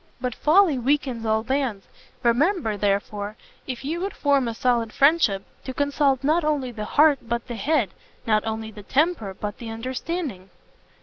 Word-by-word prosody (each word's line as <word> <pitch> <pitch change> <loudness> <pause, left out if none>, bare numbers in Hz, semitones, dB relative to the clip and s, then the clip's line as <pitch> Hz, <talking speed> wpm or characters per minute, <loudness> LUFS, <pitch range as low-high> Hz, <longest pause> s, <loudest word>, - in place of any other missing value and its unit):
But 250 -1 -2
folly 315 - +4
weakens 255 -3 0
all 220 0 +2
bands: 260 -6 -1 0.4
remember, 245 - +2
therefore, 205 +1 -1 0.3
if 260 0 -5
you 325 +4 -2
would 395 +2 -3
form 280 -3 +2
a 230 - -3
solid 235 -2 +1
friendship, 275 -10 +3 0.2
to 260 - -5
consult 285 -2 +1
not 315 +4 +2
only 290 -4 0
the 215 -3 -5
heart 295 +3 +4
but 235 0 -3
the 240 - -5
head, 235 - +1 0.3
not 215 -1 +2
only 220 0 -4
the 210 - -10
temper, 260 - 0
but 205 +1 -5
the 235 - -7
understanding." 250 - -4
250 Hz, 165 wpm, -24 LUFS, 220-290 Hz, 0.4 s, folly